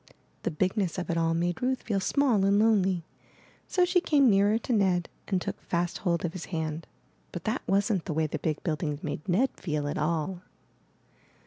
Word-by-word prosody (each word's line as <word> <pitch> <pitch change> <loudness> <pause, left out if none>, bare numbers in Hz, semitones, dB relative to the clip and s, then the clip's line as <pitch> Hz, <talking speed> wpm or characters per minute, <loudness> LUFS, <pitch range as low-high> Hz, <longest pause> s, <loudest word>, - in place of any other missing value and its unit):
The - - -1
bigness 185 +3 0
of 180 -2 -2
it 170 - -1
all 165 0 +1
made 175 +1 -1
Ruth 255 +1 0
feel 205 -3 0
small 240 0 +2
and 200 +1 +4
lonely; 195 -6 +3 0.6
so 360 -1 +3
she 360 0 +2
came 280 -8 +4
nearer 200 +2 +4
to 235 +2 -2
Ned 185 -5 +2 0.2
and 190 -2 +1
took - - -5
fast 175 0 -2
hold 170 -2 0
of 170 - -3
his 185 - -6
hand. 160 -2 -4 0.4
But 175 - -6
that 220 +4 -1
wasn't 195 -1 +1
the - - -2
way 160 +1 +1
the 155 0 -3
big 155 0 -2
build 155 -3 -1
ings 150 -3 -3
made 155 +4 -5
Ned 230 +10 +3
feel 150 -4 -2
at 145 - -2
all. 170 +3 -1
180 Hz, 200 wpm, -28 LUFS, 165-210 Hz, 0.6 s, and